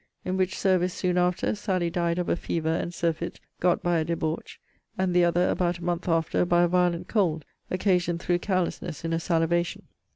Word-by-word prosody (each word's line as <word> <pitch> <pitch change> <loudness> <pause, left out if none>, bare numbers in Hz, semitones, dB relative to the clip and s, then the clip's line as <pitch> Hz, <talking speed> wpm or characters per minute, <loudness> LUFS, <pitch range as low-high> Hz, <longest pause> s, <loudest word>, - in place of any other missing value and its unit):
In 185 - -1
which 190 0 0
service, 185 -1 +2
soon 180 -2 +1
after, 180 0 +1
Sally 185 -5 -1
died 170 0 0
of 180 - -1
a - - +2
fever 165 -2 -2
and 170 +1 -2
surfeit 170 -1 -2 0.2
got 180 0 +2
by 175 -1 +2
a - - +1
debauch; 160 -1 -3 0.4
and 185 -2 0
the 180 - +5
other, 175 +1 +3
about 175 -1 0
a 170 - -11
month 175 +1 -2
after, 165 0 +2
by 175 0 +3
a - - +4
violent 180 0 +1
cold, 165 -8 +1 0.2
occasioned 180 -2 +1
through 175 +1 0
carelessness 175 -4 -2
in 165 - -1
a 165 - +1
salivation. 170 0 0
175 Hz, 195 wpm, -26 LUFS, 170-180 Hz, 0.4 s, the